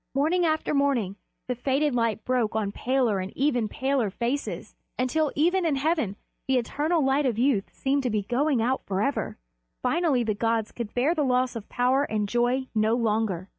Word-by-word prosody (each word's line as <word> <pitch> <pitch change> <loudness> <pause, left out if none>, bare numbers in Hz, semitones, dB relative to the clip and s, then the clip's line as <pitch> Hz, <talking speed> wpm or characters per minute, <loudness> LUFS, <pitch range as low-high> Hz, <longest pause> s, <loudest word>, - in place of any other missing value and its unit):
Morning 330 +5 +2
after 315 -1 0
morning 270 -9 +1 0.3
the 250 - 0
faded 270 +4 0
light 230 -3 0
broke 245 -4 0
on 210 -2 0
paler 245 -4 +1
and 185 +1 -4
ever 255 -6 +2
paler 265 -1 0
faces, 240 +8 -3 0.2
until 280 +4 +1
even 350 +5 +2
in 320 -4 +1
heaven 280 - 0 0.3
the 265 -1 +3
eternal 295 +6 0
light 270 +1 +2
of 235 -4 -1
youth 240 -5 +1
seemed 275 +1 0
to 255 - -1
be 210 -2 0
going 250 +2 +1
out 260 +3 0
forever. 200 +9 -1 0.5
Finally 300 -8 +2
the 220 -2 0
gods 225 +1 0
could 235 -3 -6
bear 265 +7 +2
the 315 - -1
loss 255 -2 +1
of 225 -3 -7
power 250 +3 +2
and 210 -4 -1
joy 245 +4 +1
no 220 +1 +2
longer. 215 -6 0
250 Hz, 180 wpm, -26 LUFS, 225-280 Hz, 0.5 s, the